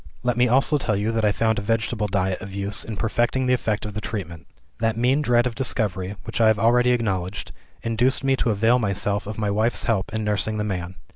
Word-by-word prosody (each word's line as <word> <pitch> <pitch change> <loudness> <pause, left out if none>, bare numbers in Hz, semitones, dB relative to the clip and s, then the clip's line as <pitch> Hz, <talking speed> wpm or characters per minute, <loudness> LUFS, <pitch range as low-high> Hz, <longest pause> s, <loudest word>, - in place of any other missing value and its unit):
"Let 125 -1 +1
me 125 +1 +3
also 135 +4 +3
tell 110 -5 0
you 105 +3 0
that 115 -1 -1
I 105 - +4
found 110 +1 +1
a - - -4
vegetable 110 0 -1
diet 95 -2 -1
of 95 0 -8
use 100 +1 -2
in 110 -2 -6
perfecting 120 +4 0
the 125 - +2
effect 110 -4 -1
of 105 - -6
the 105 - -4
treatment. 85 -8 -6 0.3
That 115 -1 0
mean 130 +5 +2
dread 120 -3 +3
of 125 - -1
discovery, 105 -6 -1
which - - -3
I 110 - +6
have 110 -1 +4
already 120 +3 +3
acknowledged, 100 -6 -1 0.3
induced 120 +4 +1
me 135 0 +3
to 120 - 0
avail 115 +4 +3
myself 100 -1 -1
of 105 - -6
my 105 -2 -1
wife's 110 +3 +1
help 100 -5 0
in 110 +1 -2
nursing 105 +1 0
the 105 - -1
man. 90 -3 -4
110 Hz, 230 wpm, -23 LUFS, 100-120 Hz, 0.3 s, I